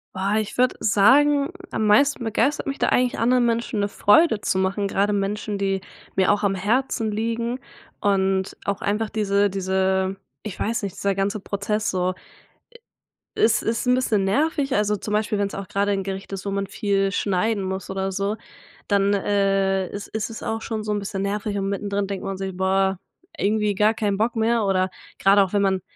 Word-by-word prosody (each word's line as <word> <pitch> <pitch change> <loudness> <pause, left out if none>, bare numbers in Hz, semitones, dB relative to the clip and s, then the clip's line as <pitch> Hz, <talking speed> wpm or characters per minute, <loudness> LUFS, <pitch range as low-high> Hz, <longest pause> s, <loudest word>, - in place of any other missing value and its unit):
Boah, 195 +2 0
ich 215 +2 -5
würde 255 0 +3
sagen 280 +8 +4 0.2
am 220 - -1
meisten 265 +5 +4
begeistert 275 +6 0
mich 275 - -3
da - - +2
eigentlich 250 0 +1
anderen 245 +1 +3
Menschen 230 -1 -1
'ne 200 - +1
Freude 220 +3 +4
zu - - 0
machen, 195 +2 0
grade 200 +1 +1
Menschen, 205 +1 -2
die 195 -1 -1 0.3
mir 190 0 +3
auch 205 0 0
am 195 -1 +2
Herzen 225 +3 0
liegen 230 +3 -2 0.4
und 190 -1 +1
auch 200 +2 -2
einfach 210 0 -1
diese 205 -1 +1
diese- 190 0 0 0.3
ich 215 -4 -7
weiß 220 0 -1
nicht- 195 - -4
dieser 200 0 0
ganze 200 +2 -1
Prozess 210 +2 -2
so. 185 0 0 1.2
E - - -2
Es 225 0 +4
ist 230 +2 -1
'n 250 - +4
bisschen 220 -6 +1
nervig, 285 +5 +1
also 210 0 +1
zum 210 +1 -6
Beispiel 210 0 0
wenn's 200 -1 -1
auch 195 -1 -6
grade 200 +1 0
'n 195 - -1
Gericht 195 +1 -6
ist, 195 0 -5
wo - - -1
man 200 0 -2
viel 195 -1 0
schneiden 200 +2 0
muss 190 +1 -4
oder 190 0 -2
so, 200 +2 -1 0.5
dann, 200 0 +3
äh, 195 -1 +1
ist 205 0 -7
ist 220 +1 -3
es 225 - -8
auch 225 0 -3
schon 220 -2 -3
so 210 - -2
'n 205 - 0
bisschen 195 -1 -4
nervig 205 +1 -2
und 195 0 -1
mittendrin 200 0 -2
denkt 195 -1 -5
man 195 0 -3
sich: 190 -1 -5
„Boah, 190 0 +1 0.4
irgendwie 210 0 +1
gar 210 +3 +3
keinen 210 -3 -1
Bock 230 +3 0
mehr.“ 225 0 +2
Oder 190 -1 +1 0.3
grade 200 +1 +5
auch 190 0 -2
wenn 205 - +2
man 190 -2 +1
200 Hz, 195 wpm, -23 LUFS, 195-220 Hz, 1.2 s, grade